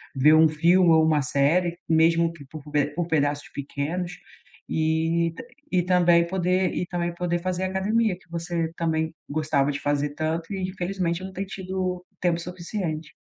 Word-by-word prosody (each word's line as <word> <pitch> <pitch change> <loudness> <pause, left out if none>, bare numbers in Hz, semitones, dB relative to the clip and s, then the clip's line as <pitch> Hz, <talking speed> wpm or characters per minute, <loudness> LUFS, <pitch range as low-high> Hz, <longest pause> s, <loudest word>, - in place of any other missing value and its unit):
ver 145 +4 +5
um 160 0 +6
filme 170 +4 +4
ou 160 -1 +5
uma 155 -2 +3
série, 165 +6 +1
mesmo 165 +1 +4
que 160 -4 -12
por 155 -2 -8
pe 145 -1 +2
por 175 0 -1
pedaços 145 -3 0
pequenos, 150 +6 -3 0.6
e 160 +1 +1
t - - -8 0.3
e 180 - +3
também 175 -1 +4
poder 185 0 +1
e 180 - -1
também 175 -1 -2
poder 175 0 -1
fazer 185 +1 -2
academia, 195 +2 +1
que - - -26
você 170 -1 -2
também 160 -1 -1 0.2
gostava 145 -2 +1
de 140 - -4
fazer 145 0 0
tanto 160 +4 -2
e 190 -1 -2
infelizmente 185 -1 -2
não 190 - -6
tem 195 +1 -3
tido 185 -1 -4 0.2
tempo 175 -2 +2
suficiente. 170 -2 -5
170 Hz, 165 wpm, -25 LUFS, 155-180 Hz, 0.6 s, um